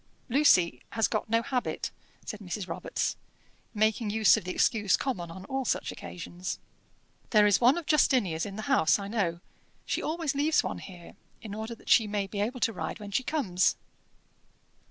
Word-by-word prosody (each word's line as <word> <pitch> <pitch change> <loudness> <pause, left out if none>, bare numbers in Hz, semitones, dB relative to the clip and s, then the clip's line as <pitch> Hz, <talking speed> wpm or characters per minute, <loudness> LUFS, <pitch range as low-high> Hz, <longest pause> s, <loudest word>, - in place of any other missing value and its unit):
"Lucy 235 - +4
has 225 -1 +2
got 215 -1 -2
no 230 +1 +2
habit," 250 0 -2 0.3
said 215 - -6
Mrs. 190 -1 -5
Robarts, - - -2 0.6
making 215 +1 +1
use 215 -1 +5
of - - -3
the - - -4
excuse 205 0 +2
common 185 -11 -3
on 185 +3 -9
all 265 +3 -2
such - - -1
occasions. 175 +1 -6 0.7
"There 210 -2 +5
is 205 +1 +4
one 250 +6 +5
of 345 - -4
Justinia's 235 - +2
in 195 - -7
the 215 - -5
house, 255 - +3
I 200 -1 -6
know. 185 -6 -1 0.4
She - - -1
always 315 -2 -1
leaves 295 +3 +2
one - - -4
here, 175 -3 -11 0.3
in 210 -3 -8
order 220 +2 -5
that - - -21
she 225 -3 +5
may 205 -1 -1
be 200 +1 -4
able 240 +4 -2
to 225 - +2
ride 190 - -5
when 205 -1 -8
she 230 - +1
comes." 240 - +1
215 Hz, 180 wpm, -29 LUFS, 190-250 Hz, 0.7 s, use